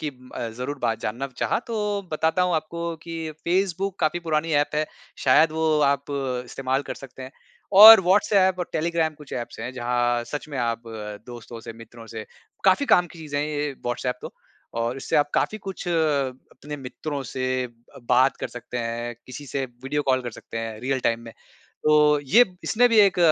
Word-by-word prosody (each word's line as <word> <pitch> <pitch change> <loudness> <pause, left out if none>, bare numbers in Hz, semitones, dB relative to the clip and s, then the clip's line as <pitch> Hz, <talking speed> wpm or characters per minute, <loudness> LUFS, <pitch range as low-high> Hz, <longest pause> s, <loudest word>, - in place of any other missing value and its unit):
की 155 - -2 0.3
अ, 115 - -3
ज़रूर 125 +5 -5
बात 115 -2 0
जानना 120 +6 -3
चाहा - - 0
तो 210 -3 -2
बताता 160 +3 +1
हूँ 180 -1 +1
आपको 170 +2 -3
कि 165 -1 -5
फ़ेसबुक 190 +2 0
काफ़ी 160 +2 +1
पुरानी 160 -1 -1
ऐप 145 0 +2
है, 155 0 +1 0.4
शायद 150 +4 +5
वो 160 -1 +1
आप 140 0 -1 0.4
इस्तेमाल 130 +2 -2
कर - - -6
सकते 135 -1 -11
हैं 130 - -8 0.5
और 220 -1 +13
व्हाट्सऐप 190 0 +3
और 180 - -3
टेलीग्राम 160 -1 0
कुछ 150 -2 -14
ऐप्स 120 -1 -5
हैं, 125 - -5
जहाँ 120 -1 0
सच 150 +5 -6
में 140 - -5
आप 115 -1 -1 0.4
दोस्तों 120 -1 -9
से 115 - -8
मित्रों 115 0 -13
से 110 -1 -7 0.4
काफ़ी 195 +9 +4
काम 180 - +5
की 170 - -13
चीज़ें 150 -3 -4
हैं 150 - -1
ये 150 -1 -2
व्हाट्सऐप 125 +1 -2
तो, - - -7 0.4
और 115 +2 -1
इससे 135 - -1
आप 145 0 +2
काफ़ी 215 - 0
कुछ 195 -2 -7
अपने 150 -3 -2
मित्रों 140 +2 -5
से 130 -1 -2
अ, 120 -1 -14
बात 130 +2 +4
कर - - -4
सकते 125 0 -7
हैं, 120 0 -3
किसी 130 +3 -9
से 135 0 -2
वीडियो 135 +4 -4
कॉल 130 -2 +1
कर 120 - -4
सकते 115 - -8
हैं 115 -1 -5
रियल 130 +2 -1
टाइम 115 -1 +1
में। 115 - -10 0.5
तो 150 -1 +5
ये 205 - +5 0.2
इसमें 245 +2 +4
भी 230 -2 +3
एक 195 -2 +4
145 Hz, 190 wpm, -24 LUFS, 125-165 Hz, 0.5 s, और